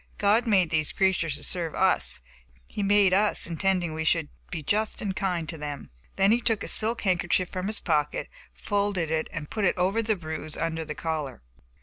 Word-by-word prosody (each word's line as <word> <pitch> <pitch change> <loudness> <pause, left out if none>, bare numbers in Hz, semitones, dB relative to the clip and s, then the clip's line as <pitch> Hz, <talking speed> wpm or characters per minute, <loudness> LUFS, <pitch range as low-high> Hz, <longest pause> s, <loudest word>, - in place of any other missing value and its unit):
God 215 +4 +3
made 185 -6 +3
these 155 -2 +1
creatures 185 -6 +1
to - - -7
serve 170 -3 -2
us, - - +2 0.3
but - - -30
he 205 - -5
made 200 -1 +4
us 205 +2 +3
intending 175 0 0
we 160 0 -3
should 160 -1 +1 0.2
be 160 -3 -5
just 215 +8 0
and 195 -3 -3
kind 180 -5 -1
to 165 -1 -6
them." 145 - -6 0.2
Then 195 +1 +4
he 235 +2 +3
took 225 -3 +1
a - - -5
silk 225 +2 +2
handkerchief 180 -1 +1
from 185 0 -3
his 215 +1 -3
pocket, 150 -4 0 0.2
folded 200 -5 -1 0.2
and 150 -3 -6
put 215 - -2
it 190 - +2
over 190 +5 +2
the 220 -1 +1
bruise 155 -3 -6
under 165 0 -2
the 150 -1 -6
collar. 150 - -4
180 Hz, 200 wpm, -27 LUFS, 160-205 Hz, 0.3 s, made